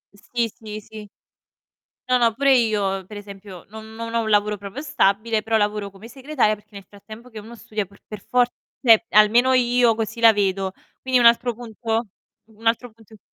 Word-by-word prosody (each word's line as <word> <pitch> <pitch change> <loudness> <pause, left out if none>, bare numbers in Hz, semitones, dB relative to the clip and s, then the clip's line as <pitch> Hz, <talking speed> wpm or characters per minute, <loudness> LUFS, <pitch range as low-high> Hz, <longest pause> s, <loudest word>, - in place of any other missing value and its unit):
Sì, 235 +3 -3
sì, 215 -1 -9
sì. 215 0 -12 1.0
No 255 0 +3
no, 235 -2 +2
pure 275 +3 +3
io, 200 -5 0
per 210 +1 -10
esempio, 200 -3 -11
non 220 +1 -11
non 230 0 -7
ho 230 - +1
un 220 - -3
lavoro 210 0 +2
proprio 200 +8 -8
stabile, 215 -5 0
però 225 0 +1
lavoro 205 -1 -1
come 200 +4 -13
segretaria 260 -4 -1
perché 210 +1 -23
nel 195 -2 -10
frattempo 215 +4 -13
che 220 - -9
uno 225 +3 -11
studia 215 -2 -4
pur 200 +2 -22
per 210 -2 -9
for 250 -1 +2 0.3
cioè 230 -3 +5
almeno 230 +5 +5
io 245 -2 +3
così 225 +1 -4
la 225 -1 +8
vedo. 195 -2 -1 0.3
Quindi 260 -1 +2
un 240 - +3
altro 235 +1 +4
punto 225 -1 -4 0.4
un 220 +1 -19
altro 235 +1 0
punto 225 -1 -21
in 215 - -15
220 Hz, 195 wpm, -22 LUFS, 205-235 Hz, 1.0 s, la